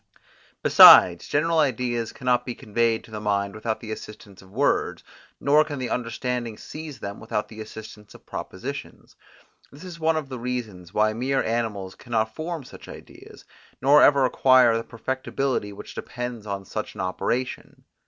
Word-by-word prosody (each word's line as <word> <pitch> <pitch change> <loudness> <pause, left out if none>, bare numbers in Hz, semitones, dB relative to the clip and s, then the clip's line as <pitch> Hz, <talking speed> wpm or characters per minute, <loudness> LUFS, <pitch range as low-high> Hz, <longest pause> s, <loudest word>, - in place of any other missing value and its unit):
Besides, 85 -1 +8
general 165 +2 +1
ideas 120 -5 0
cannot 125 -1 0
be 125 - -6
conveyed 115 +1 0
to - - -16
the 105 -1 -6
mind 100 -1 -1
without 110 0 -4
the 110 - -7
assistance 105 -2 -10
of 95 - -18
words, 130 +9 0 0.4
nor 150 +2 +4
can 150 -2 -6
the 130 -2 -4
understanding 120 -1 -3
seize 155 -2 -9
them 100 0 -6
without 105 0 -3
the 110 -1 -9
assistance 110 -1 -11
of - - -16
propositions. - - -8 0.6
This 145 +5 -13
is 175 -2 -9
one 160 0 +1
of 155 -3 -4
the 130 -2 -7
reasons, 115 -8 -5
why 110 +1 +2
mere 130 +4 0
animals 110 -5 -2
cannot 110 -2 -2
form 160 +1 -5
such - - -13
ideas, - - -13 0.3
nor 140 +3 +6
ever 140 -2 +5
acquire 130 -2 +5
the 115 - -2
perfectibility 130 -1 -3
which 100 - -10
depends 120 -3 -6
on 100 -1 -4
such 110 +2 -5
an 100 - -5
operation. 120 +7 -3
120 Hz, 165 wpm, -24 LUFS, 110-130 Hz, 0.6 s, Besides